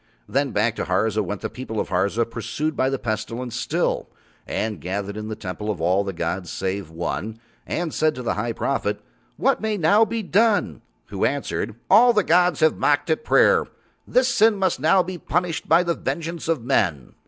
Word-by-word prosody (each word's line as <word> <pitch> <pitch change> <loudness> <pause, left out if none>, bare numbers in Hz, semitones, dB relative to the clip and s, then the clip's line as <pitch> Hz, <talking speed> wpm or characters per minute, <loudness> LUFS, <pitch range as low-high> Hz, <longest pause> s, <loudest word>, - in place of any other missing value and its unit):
Then 140 +1 0
back 110 +1 0
to - - -2
Harza 105 +3 +1
went 100 +1 -5
the - - -2
people 120 -4 -5
of - - -2
Harza 100 +6 +1
pursued 145 +7 -3
by 130 +1 +1
the 135 - -1
Pestilence 115 +2 -4
still, - - -1 0.4
and 110 -1 -3
gathered 100 +3 -4
in 105 0 -5
the 110 - -4
Temple 105 0 -6
of 105 - -2
All 90 +4 +2
the 100 - -3
gods 85 0 -3
save 95 -2 -3
One, 90 +6 -4 0.3
and 170 -3 -2
said 155 0 +1
to 125 - -6
the - - 0
High 115 +3 -2
Prophet: 105 -5 -1 0.4
"What 270 0 +1
may 215 -1 -1
now 200 +6 +4
be 225 0 -2
done?" 205 +2 +2 0.3
who - - -3
answered: - - -1
"All 240 +5 +6
the 210 -3 +3
gods 175 0 +3
have 155 0 +4
mocked 145 +2 +2
at 160 - 0
prayer. 460 - +4 0.4
This 255 0 +3
sin 220 -1 +4
must 190 -7 0
now 170 +6 +4
be 180 -1 -6
punished 175 0 -2
by 165 +3 +5
the 170 -1 0
vengeance 170 0 -4
of 160 -7 0
men." 85 - 0
130 Hz, 195 wpm, -23 LUFS, -, 0.4 s, All